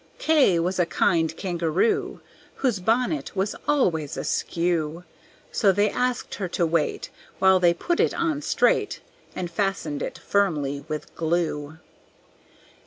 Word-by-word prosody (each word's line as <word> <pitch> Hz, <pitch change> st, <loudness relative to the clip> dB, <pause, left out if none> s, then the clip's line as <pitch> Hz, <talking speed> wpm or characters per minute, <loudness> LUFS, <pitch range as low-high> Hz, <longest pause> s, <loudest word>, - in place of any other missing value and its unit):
K 295 Hz, -, +4 dB
was 180 Hz, +3 st, -1 dB
a 175 Hz, -, +3 dB
kind 165 Hz, -1 st, +1 dB
Kangaroo, 175 Hz, +2 st, 0 dB, 0.3 s
Whose 245 Hz, -8 st, 0 dB
bonnet 245 Hz, -, 0 dB
was 195 Hz, +2 st, -1 dB
always 175 Hz, -, +1 dB
askew; 170 Hz, -1 st, -1 dB, 0.5 s
So 200 Hz, -4 st, +3 dB
they 205 Hz, +2 st, +2 dB
asked 250 Hz, 0 st, -1 dB
her 195 Hz, -, -3 dB
to 170 Hz, 0 st, 0 dB
wait 165 Hz, -2 st, -1 dB, 0.3 s
While 190 Hz, -1 st, +5 dB
they 175 Hz, -1 st, +4 dB
put 345 Hz, -, -1 dB
it -, -, +3 dB
on 315 Hz, -4 st, -1 dB
straight -, -, +1 dB, 0.3 s
And 175 Hz, -2 st, -4 dB
fastened 195 Hz, -8 st, -2 dB
it -, -, -4 dB
firmly 150 Hz, -9 st, 0 dB
with 155 Hz, -1 st, -5 dB
glue. 160 Hz, -2 st, -2 dB
180 Hz, 130 wpm, -24 LUFS, 165-205 Hz, 0.5 s, While